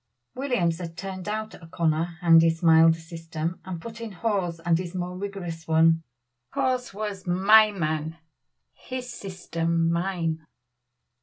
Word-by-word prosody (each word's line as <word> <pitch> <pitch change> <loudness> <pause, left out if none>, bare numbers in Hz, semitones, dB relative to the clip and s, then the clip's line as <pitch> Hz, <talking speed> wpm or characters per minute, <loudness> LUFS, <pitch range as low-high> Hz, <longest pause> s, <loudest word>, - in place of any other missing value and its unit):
Williams 220 -12 0
had 165 -2 -7
turned 190 0 -5
out 215 +1 -3
O'Connor 165 0 -1
and 165 -1 +7
his 165 +1 +1
milder 165 0 +6
system, 165 0 -5
and 185 -3 -6
put 230 +5 -9
in 230 -2 -5
Hawes 190 -5 -1
and 165 0 +2
his 180 0 -6
more 180 0 -3
rigorous 180 -4 -6
one. 165 0 +4 0.5
Hawes 255 -1 0
was 200 -2 -5
"my 210 +5 +6
man 160 -3 -2 0.6
his 255 -1 -7
system 170 -4 -1
mine." 170 -2 -1
175 Hz, 135 wpm, -26 LUFS, 165-195 Hz, 0.6 s, and